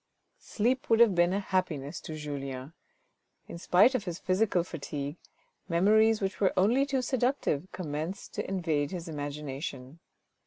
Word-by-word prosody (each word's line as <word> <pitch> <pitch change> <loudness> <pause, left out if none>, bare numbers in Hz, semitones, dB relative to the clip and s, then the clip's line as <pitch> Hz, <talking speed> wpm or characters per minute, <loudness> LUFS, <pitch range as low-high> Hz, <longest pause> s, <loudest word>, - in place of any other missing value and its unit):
Sleep 255 +6 -1
would 225 - +4
have 235 -4 +6
been 175 0 +3
a 195 - 0
happiness 180 -8 -2
to 155 - -7
Julien. 140 -2 -6 0.7
In 170 - -8
spite 190 +9 +5
of 240 -6 -1
his 175 -2 -4
physical 185 -1 +1
fatigue, 145 -3 -5 0.5
memories 215 +5 +4
which 195 +1 -3
were 195 - +3
only 240 +9 +3
too 270 -2 0
seductive 245 - 0
commenced 160 +1 -5
to - - -4
invade 160 -6 0
his 175 -2 -6
imagination. 145 -1 -6
180 Hz, 145 wpm, -29 LUFS, 150-210 Hz, 0.7 s, have